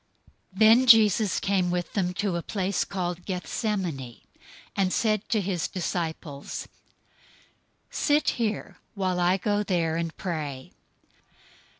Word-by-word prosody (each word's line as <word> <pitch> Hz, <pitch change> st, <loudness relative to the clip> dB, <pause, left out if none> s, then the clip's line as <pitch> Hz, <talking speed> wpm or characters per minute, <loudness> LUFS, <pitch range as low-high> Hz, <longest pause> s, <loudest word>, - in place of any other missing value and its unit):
026:036 190 Hz, -, -11 dB
Then 225 Hz, +4 st, +7 dB
Jesus 215 Hz, -3 st, +6 dB
came 190 Hz, -2 st, +1 dB
with 175 Hz, -1 st, -2 dB
them 185 Hz, -3 st, 0 dB
to 200 Hz, -2 st, -1 dB
a 170 Hz, -, -1 dB
place 195 Hz, +1 st, -1 dB
called 180 Hz, -2 st, -3 dB
Gethsemane, 180 Hz, -, -3 dB, 0.5 s
and 190 Hz, -2 st, +1 dB
said 215 Hz, -1 st, 0 dB
to 220 Hz, -, +2 dB
his 180 Hz, -4 st, -1 dB
disciples, 160 Hz, -5 st, -4 dB, 1.2 s
"Sit 295 Hz, 0 st, +2 dB
here, 220 Hz, -2 st, -2 dB, 0.2 s
while 185 Hz, -2 st, -1 dB
I 180 Hz, +2 st, +3 dB
go 205 Hz, +1 st, 0 dB
there 170 Hz, -5 st, 0 dB
and 165 Hz, -1 st, -3 dB
pray." 150 Hz, -8 st, -4 dB
185 Hz, 120 wpm, -26 LUFS, 170-205 Hz, 1.2 s, Then